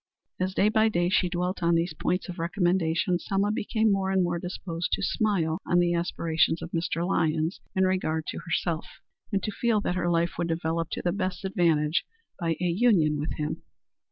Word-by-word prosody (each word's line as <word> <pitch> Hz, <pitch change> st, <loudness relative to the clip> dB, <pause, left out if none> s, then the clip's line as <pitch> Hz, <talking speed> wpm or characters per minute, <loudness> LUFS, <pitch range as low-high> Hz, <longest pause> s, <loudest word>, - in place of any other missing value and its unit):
As 185 Hz, +1 st, -1 dB
day 205 Hz, -, +4 dB
by 220 Hz, 0 st, +3 dB
day 175 Hz, -4 st, +1 dB
she 180 Hz, -1 st, +2 dB
dwelt 180 Hz, +1 st, -2 dB
on 170 Hz, 0 st, +3 dB
these 165 Hz, 0 st, 0 dB
points 180 Hz, +4 st, -1 dB
of 180 Hz, -1 st, -7 dB
recommendation, 175 Hz, -1 st, +1 dB
Selma 200 Hz, +2 st, 0 dB
became 220 Hz, 0 st, +1 dB
more 195 Hz, -1 st, +1 dB
and 190 Hz, -1 st, +2 dB
more 175 Hz, -1 st, -1 dB
disposed 175 Hz, -1 st, -4 dB
to -, -, 0 dB
smile 185 Hz, -7 st, +1 dB
on 175 Hz, -, +1 dB
the 175 Hz, 0 st, +3 dB
aspirations 165 Hz, -1 st, 0 dB
of 170 Hz, -, -7 dB
Mr. 170 Hz, 0 st, -1 dB
Lyons 160 Hz, -2 st, 0 dB, 0.2 s
in 190 Hz, -, +3 dB
regard 170 Hz, -4 st, 0 dB
to -, -, -4 dB
herself, 165 Hz, 0 st, -2 dB, 0.4 s
and 195 Hz, -2 st, 0 dB
to 215 Hz, -, -2 dB
feel 225 Hz, +1 st, +1 dB
that 180 Hz, -, -1 dB
her 175 Hz, -1 st, 0 dB
life 170 Hz, 0 st, 0 dB
would 170 Hz, -, 0 dB
develop 165 Hz, 0 st, -1 dB
to -, -, -4 dB
the 175 Hz, -, +1 dB
best 185 Hz, 0 st, -3 dB
advantage 165 Hz, -4 st, +2 dB, 0.4 s
by 165 Hz, -1 st, 0 dB
a 180 Hz, -, -1 dB
union 175 Hz, -5 st, +3 dB
with 150 Hz, -, -2 dB
him. 150 Hz, 0 st, -3 dB
175 Hz, 195 wpm, -27 LUFS, 165-190 Hz, 0.4 s, day